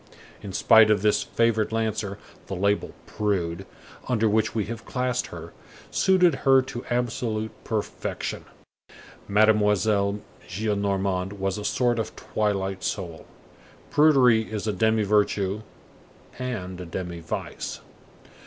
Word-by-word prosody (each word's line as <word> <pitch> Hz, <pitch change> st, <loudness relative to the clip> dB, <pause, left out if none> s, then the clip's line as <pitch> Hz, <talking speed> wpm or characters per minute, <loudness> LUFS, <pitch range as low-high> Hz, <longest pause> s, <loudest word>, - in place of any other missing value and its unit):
In 100 Hz, -2 st, -7 dB
spite 110 Hz, +3 st, +6 dB
of 105 Hz, -2 st, +2 dB
this 105 Hz, -1 st, +3 dB
favored 115 Hz, -2 st, +1 dB
Lancer, 110 Hz, -3 st, -2 dB, 0.3 s
the 95 Hz, -, -4 dB
label: 100 Hz, +3 st, 0 dB
Prude, 95 Hz, -3 st, -2 dB, 0.4 s
under 115 Hz, -3 st, +2 dB
which 110 Hz, +1 st, +1 dB
we 110 Hz, -3 st, 0 dB
have 115 Hz, -1 st, -6 dB
classed 125 Hz, -1 st, -1 dB
her, -, -, -9 dB, 0.4 s
suited 180 Hz, -6 st, +4 dB
her 135 Hz, -1 st, +5 dB
to 120 Hz, -2 st, -7 dB
absolute 115 Hz, -2 st, -1 dB
perfection. 110 Hz, -2 st, -4 dB, 0.8 s
Mademoiselle 105 Hz, -1 st, +3 dB, 0.3 s
Gillenormand 100 Hz, -1 st, -1 dB
was 95 Hz, 0 st, -2 dB
a -, -, -6 dB
sort 120 Hz, +3 st, +1 dB
of 110 Hz, -, -4 dB
twilight 95 Hz, -3 st, -2 dB
soul. 85 Hz, -5 st, -4 dB, 0.6 s
Prudery 130 Hz, -8 st, +5 dB
is 105 Hz, -1 st, -3 dB
a 105 Hz, -, 0 dB
demi 110 Hz, +3 st, +2 dB
virtue 105 Hz, -1 st, +1 dB, 0.8 s
and 95 Hz, -8 st, -4 dB
a -, -, -6 dB
demi 85 Hz, 0 st, -5 dB
vice. 80 Hz, -1 st, -5 dB
105 Hz, 120 wpm, -25 LUFS, 100-115 Hz, 0.8 s, spite